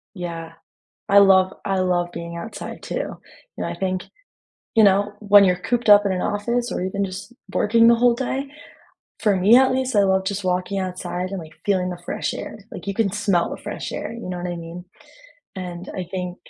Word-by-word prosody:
Yeah. 165 Hz, -2 st, -6 dB, 0.6 s
I 200 Hz, +1 st, +6 dB
love 190 Hz, -1 st, +6 dB
I 195 Hz, -1 st, 0 dB
love 175 Hz, -1 st, 0 dB
being 170 Hz, 0 st, -6 dB
outside 220 Hz, +7 st, -7 dB
too. -, -, -6 dB
You -, -, -4 dB, 0.4 s
know, -, -, -2 dB
I -, -, -4 dB
think 185 Hz, -1 st, -2 dB, 0.7 s
you 220 Hz, -, +6 dB
know, 200 Hz, +1 st, +3 dB
when 205 Hz, -1 st, +6 dB
you're 180 Hz, -1 st, +4 dB
cooped 240 Hz, +1 st, -1 dB
up 205 Hz, 0 st, +8 dB
in 195 Hz, -, +1 dB
an 180 Hz, -, -1 dB
office 235 Hz, +4 st, -1 dB
or -, -, -2 dB
even 200 Hz, +2 st, -2 dB
just 200 Hz, +5 st, -8 dB, 0.2 s
working 230 Hz, +2 st, +4 dB
the 235 Hz, -, +7 dB
whole 240 Hz, 0 st, +4 dB
day, 265 Hz, +2 st, -3 dB, 0.7 s
for 210 Hz, -4 st, +2 dB
me 205 Hz, +6 st, +6 dB
at 260 Hz, 0 st, +4 dB
least, 260 Hz, -2 st, -1 dB
I 200 Hz, -, +5 dB
love 190 Hz, 0 st, +2 dB
just 200 Hz, 0 st, -3 dB
walking 185 Hz, +2 st, -1 dB
outside 185 Hz, 0 st, -4 dB
and, 195 Hz, -, -3 dB
like, 160 Hz, -2 st, -10 dB
feeling 185 Hz, -3 st, +1 dB
the 175 Hz, -1 st, -7 dB
fresh -, -, -2 dB
air. -, -, -7 dB
Like, -, -, -9 dB
you 200 Hz, -, -1 dB
can 200 Hz, -3 st, +1 dB
smell 200 Hz, -4 st, +1 dB
the -, -, -7 dB
fresh -, -, -6 dB
air, -, -, -5 dB
you 230 Hz, -6 st, -7 dB
know 180 Hz, -, -4 dB
what 175 Hz, 0 st, -4 dB
I 175 Hz, -, -3 dB
mean? 170 Hz, +2 st, -8 dB, 0.7 s
And 180 Hz, -1 st, -7 dB
I 185 Hz, -, -3 dB
think 180 Hz, -1 st, -4 dB
195 Hz, 210 wpm, -22 LUFS, 180-210 Hz, 0.7 s, up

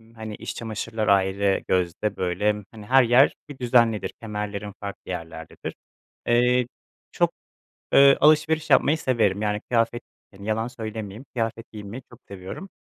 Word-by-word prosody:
hani 110 Hz, -2 st, -7 dB
iç -, -, -6 dB
çamaşırlar 110 Hz, -1 st, -4 dB
ayrı 100 Hz, 0 st, +2 dB
gözde 95 Hz, +3 st, 0 dB
böyle, 105 Hz, +4 st, 0 dB
hani 110 Hz, -2 st, -11 dB
her 130 Hz, +3 st, +5 dB
yer 125 Hz, +4 st, +5 dB, 0.2 s
bir 140 Hz, -, -9 dB
düzenlidir, 115 Hz, -3 st, +2 dB
kemerlerim 105 Hz, -2 st, -5 dB
farklı 100 Hz, -2 st, -7 dB
yerlerdedir. 80 Hz, -2 st, -7 dB, 0.5 s
Eee, 125 Hz, +1 st, +3 dB, 0.4 s
çok, -, -, +1 dB, 0.6 s
ııı, 140 Hz, 0 st, +7 dB
alışveriş 155 Hz, +1 st, +3 dB
yapmayı 155 Hz, +3 st, +4 dB
severim, 110 Hz, -8 st, +1 dB
yani 105 Hz, 0 st, -1 dB
kıyafet, 120 Hz, 0 st, +1 dB, 0.3 s
yani 100 Hz, +1 st, -11 dB
yalan 110 Hz, +2 st, 0 dB
söylemeyeyim, 110 Hz, -1 st, -7 dB
kıyafet 115 Hz, 0 st, -3 dB
giymeyi 105 Hz, +4 st, -8 dB
çok 120 Hz, -, -15 dB
seviyorum. 100 Hz, -, -8 dB
110 Hz, 135 wpm, -24 LUFS, 100-120 Hz, 0.6 s, ııı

